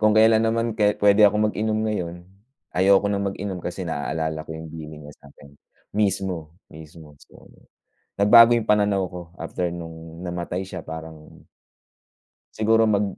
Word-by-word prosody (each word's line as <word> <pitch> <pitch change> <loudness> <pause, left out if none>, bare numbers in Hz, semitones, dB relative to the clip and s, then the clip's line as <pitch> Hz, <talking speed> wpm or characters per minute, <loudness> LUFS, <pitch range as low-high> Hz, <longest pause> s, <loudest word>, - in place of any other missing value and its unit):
kung 110 0 +4
kelan 110 0 +5
naman 115 +1 0
kahit 105 -1 +1
pwede 105 +1 +6
akong 105 +1 +2
mag-inom 110 0 -1
ngayon, 90 -6 -3 0.6
ayoko 95 +2 +4
nang 100 0 -1
mag-inom 95 -2 -5
kasi 90 +2 -5
naalala 80 0 -3
ko - - -11
yung 80 -1 -9
bilin 75 -1 -9
niya 75 - -11
sa'kin. 70 0 -17 0.4
Mismo, 95 -5 -1 0.2
mismo. 80 -1 -13
So, - - -19 0.8
nagbago 115 +3 +8
'yung 115 -2 -2
pananaw 105 -2 +2
ko 90 0 -7 0.2
after 85 +1 -3
no'ng 80 0 -9
namatay 90 +1 -4
siya. 90 -2 -7
Parang 80 -1 -10 1.1
siguro 110 +1 +3
mag 105 -1 +2
95 Hz, 145 wpm, -23 LUFS, 80-105 Hz, 1.1 s, nagbago